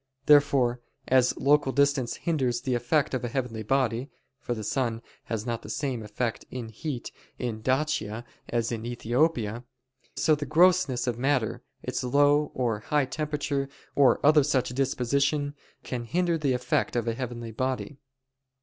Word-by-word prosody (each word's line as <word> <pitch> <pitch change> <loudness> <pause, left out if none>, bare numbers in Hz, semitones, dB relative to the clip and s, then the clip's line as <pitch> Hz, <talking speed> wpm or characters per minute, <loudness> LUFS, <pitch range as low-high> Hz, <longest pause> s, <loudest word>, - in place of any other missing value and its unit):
Therefore 140 -5 +4 0.3
as 130 -1 +4
local 140 0 +3
distance 140 -3 +2
hinders 130 -8 -1
the 130 0 -1
effect 125 +5 +1
of 130 - -1
a - - -1
heavenly 120 -3 -3
body 125 +2 0 0.3
(for 120 - -3
the 110 - -5
sun 115 0 -1 0.2
has 110 -1 -3
not 120 -1 -2
the - - -10
same 130 -5 -2
effect 110 +2 -3
in 120 -3 -6
heat 125 +2 -5 0.3
in 115 -3 -4
Dacia 130 -4 -1 0.2
as 115 -1 0
in 115 -2 -3
Ethiopia); 120 -1 0 0.5
so 155 - +3
the 145 -1 -2
grossness 165 -5 +4
of 120 -2 -2
matter, 130 -4 0 0.2
its - - -3
low 145 +3 +3
or 120 -4 0
high 145 +5 +1
temperature 145 -1 -2 0.2
or 140 -3 +4
other 150 0 +7
such 135 -3 +1
disposition, 140 +3 0 0.3
can 120 -2 -4
hinder 175 +6 +1
the 145 -5 +1
effect 125 0 0
of 120 -1 0
a 115 - +1
heavenly 120 -2 -5
body. 130 +4 -3
130 Hz, 155 wpm, -27 LUFS, 120-145 Hz, 0.5 s, other